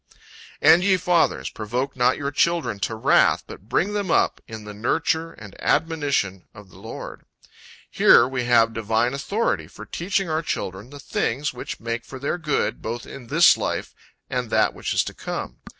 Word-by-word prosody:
"And 175 +2 +7
ye 190 -1 +4
fathers, 170 - +1
provoke 125 +6 -3
not 125 0 +2
your 140 -1 -3
children 165 -8 +1
to 110 - -2
wrath, 110 - +3
but 100 - -12
bring 200 +4 +1
them 205 -3 -2
up - - +2
in 110 -1 -8
the 105 0 -8
nurture 160 +9 -1
and 105 -3 -12
admonition 140 - 0
of 105 -2 -13
the - - -15
Lord." - - -8 0.7
Here, 120 - +6
we 130 -2 -3
have 115 -1 +4
divine 115 +3 0
authority, 140 - -1
for 110 +5 -11
teaching 185 - -2
our 155 0 0
children, 100 - -4
the 145 +1 -11
things, 140 +1 -2
which 125 - -7
make 115 +1 -4
for 135 - -9
their 140 +6 -2
good, 150 -9 -1
both 120 +2 -5
in 125 -4 -10
this - - +6
life - - -3 0.3
and - - -3
that - - +2
which - - -4
is - - +3
to - - -7
come. - - -6
125 Hz, 180 wpm, -23 LUFS, 110-160 Hz, 0.7 s, And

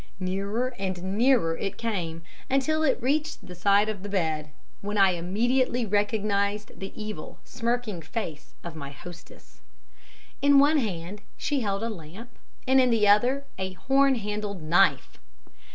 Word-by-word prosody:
Nearer 200 +7 -2
and 190 0 -3
nearer 230 -8 +3
it 195 +2 -4
came, 175 -8 -3 0.3
until 275 +4 +1
it 275 -5 +2
reached 300 +4 -1
the 180 - -9
side 200 +4 +3
of 215 -3 -4
the 205 - -6
bed, 160 -6 -1 0.3
when 205 +1 -3
I 195 -1 +6
immediately 235 +8 0
recognized 205 0 0
the 195 - -6
evil, 215 -7 -6
smirking 235 -6 -2
face 160 -2 -6
of 170 -2 -7
my 140 -3 -6
hostess. 170 +4 -13 0.8
In 285 0 +6
one 290 +2 +5
hand 195 -3 -4 0.2
she 290 - 0
held 200 -3 -1
a 230 - -1
lamp 195 +6 -10 0.4
and 265 0 +6
in 255 - +3
the 220 -3 +3
other 245 +7 +4
a 190 0 -3
horn 270 +6 +3
handled 210 -4 -4
knife. 175 +5 +2
205 Hz, 150 wpm, -26 LUFS, 185-245 Hz, 0.8 s, I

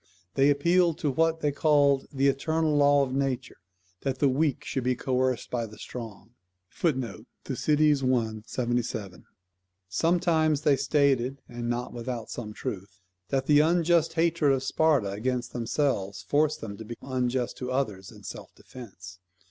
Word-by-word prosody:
They 135 +1 +4
appealed 170 +3 +3
to 145 - 0
what 165 +3 +1
they 150 - +1
called 140 -2 +3
"the 135 0 +2
eternal 155 +3 +1
law 145 -1 +5
of 130 -1 -3
nature, 135 -2 -2 0.4
that 135 -2 -2
the 140 +1 +3
weak 145 +2 0
should 130 - -2
be 125 0 +1
coerced 130 0 -1
by 120 -2 -1
the 110 0 -13
strong." 115 -3 -9 0.4
[THUC. 130 -8 -2 0.2
i. 130 -6 +1
77.] 120 -6 -3 0.6
Sometimes 160 - +2
they 150 -2 +4
stated, 135 -1 +1
and 120 -1 -5
not 120 +1 -3
without 120 -1 -5
some 110 -3 -6
truth, 100 -2 -6 0.3
that 135 -1 0
the 145 0 +5
unjust 170 +1 +3
hatred 165 -3 +2
of 135 -1 -1
Sparta 140 -8 +2
against 120 +4 -2
themselves 115 -6 -1
forced 150 - +1
them 100 -2 -6
to 110 - -8
be 120 +2 -7
unjust 125 -1 -1
to 125 0 -4
others 105 -8 -2
in - - -15
self - - -9
defence. 95 -8 -12
130 Hz, 150 wpm, -27 LUFS, 120-150 Hz, 0.6 s, law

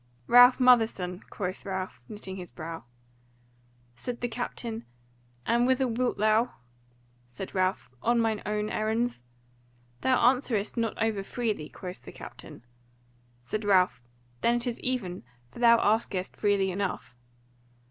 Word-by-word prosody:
"Ralph 245 - +8
Motherson," 220 -8 +3
quoth 185 -1 -4
Ralph, 190 -8 -4
knitting 195 -3 -7
his 180 -2 -8
brow. 165 -4 -7 1.1
Said 235 - -6
the 245 - 0
captain 230 -1 -4 0.6
"And 235 +1 +3
whither 260 0 +2
wilt 245 +1 0
thou?" 215 +3 +2 0.7
Said 125 +10 -8
Ralph, 185 -5 0
"On 235 0 +2
mine 225 -2 +1
own 210 0 -2
errands." 220 - -1 0.8
"Thou 260 -1 +3
answerest 240 -4 +2
not 230 -2 -1
over 220 -2 +1
freely," 215 -8 -3
quoth 180 -1 -8
the - - -11
captain. 120 - -11 0.8
Said 215 - -3
Ralph, 185 -10 +3 0.4
"Then 235 - +3
is 240 -1 -2
it - - -15
even; 220 -9 -1 0.3
for - - -11
thou 235 -1 +6
askest 205 -4 0
freely 200 -2 +2
enough." 190 -9 -3
215 Hz, 130 wpm, -28 LUFS, 190-240 Hz, 1.1 s, Ralph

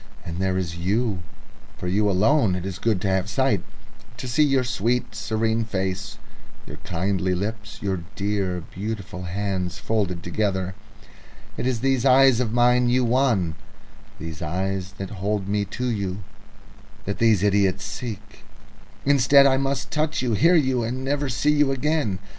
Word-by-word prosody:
And 85 +1 -5
there 95 -1 0
is 85 -3 -3
you. 100 +3 0 0.6
For 90 - -5
you 105 +3 +2
alone 105 +2 +3
it 90 0 -4
is 95 -1 -5
good 110 -4 +1
to 100 - -1
have 95 +1 0
sight, 110 -3 +1 0.6
to 130 - -6
see 125 +5 +1
your 135 -3 +3
sweet, 120 0 -1
serene 110 +1 0
face, 100 -1 -3 0.5
your - - -9
kindly 95 +1 -1
lips, 110 +2 -4
your 95 -2 0 0.2
dear, 100 -3 -1
beautiful 100 -2 -5
hands 95 -1 -2
folded 95 -6 -1
together... 95 0 -1 0.8
It 125 - -2
is 120 -3 -1
these 135 -2 +1
eyes 135 -2 +6
of 120 -4 0
mine 125 +1 +4
you 125 0 +3
won, 115 -9 +2 0.6
these 80 +1 -7
eyes 95 +3 -2
that 95 -1 -7
hold 100 -1 -1
me 100 0 0
to 125 +5 -4
you, 100 -4 -2 0.8
that 100 - -3
these 110 -4 +4
idiots 100 -2 +2
seek. 110 -4 -7 0.6
Instead, 140 0 +6
I 135 -1 +4
must 135 0 -2
touch 155 -1 0
you, 120 -3 0
hear 165 - +4
you, 130 -6 +2
and 125 +3 -3
never 145 0 0
see 140 +4 +2
you 150 -2 +3
again. 135 -6 0
105 Hz, 160 wpm, -24 LUFS, 95-125 Hz, 0.8 s, eyes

